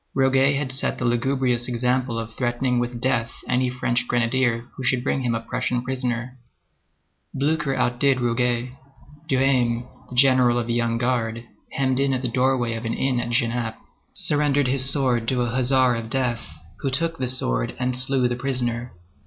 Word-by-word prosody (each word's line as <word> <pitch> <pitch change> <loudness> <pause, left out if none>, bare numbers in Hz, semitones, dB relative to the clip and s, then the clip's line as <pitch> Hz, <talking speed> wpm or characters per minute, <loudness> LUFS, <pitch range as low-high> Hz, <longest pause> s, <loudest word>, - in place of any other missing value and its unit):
Roguet 135 +1 +3
had 135 -2 -2
set 130 - -1
the 125 - -3
lugubrious 120 0 +1
example 125 0 0
of 115 0 -5
threatening 120 +1 0
with 120 0 -3
death 120 -2 0 0.2
any 125 0 +1
French 120 -1 0
grenadier 120 0 +1
who 130 - -7
should 125 0 +1
bring 135 - 0
him 120 -2 0
a - - -1
Prussian 125 0 -2
prisoner. 125 -1 -3 1.0
Blücher 150 0 0
outdid 130 +2 +2
Roguet. 120 0 0 0.6
Duhesme, 125 -3 +2 0.2
the 125 - -8
general 125 -2 +5
of 120 - -1
the 115 - -2
Young 115 -1 0
Guard, 115 -1 -1 0.3
hemmed 130 -1 0
in 135 -1 +2
at 130 - -4
the 125 - -1
doorway 125 -1 +1
of 115 0 -5
an 115 - -2
inn 130 -2 0
at 120 - -3
Genappe, 120 -1 0 0.4
surrendered 145 -1 +1
his 130 +1 +4
sword 125 -5 +1
to 125 0 +1
a 120 - -2
huzzar 130 0 +3
of 115 -1 -5
death, 125 -2 -1 0.3
who 135 - -1
took 165 +4 -1
the 130 - -1
sword - - +1
and 125 0 -1
slew 130 0 +2
the 120 - -2
prisoner. 120 -2 -2
125 Hz, 175 wpm, -23 LUFS, 120-130 Hz, 1.0 s, general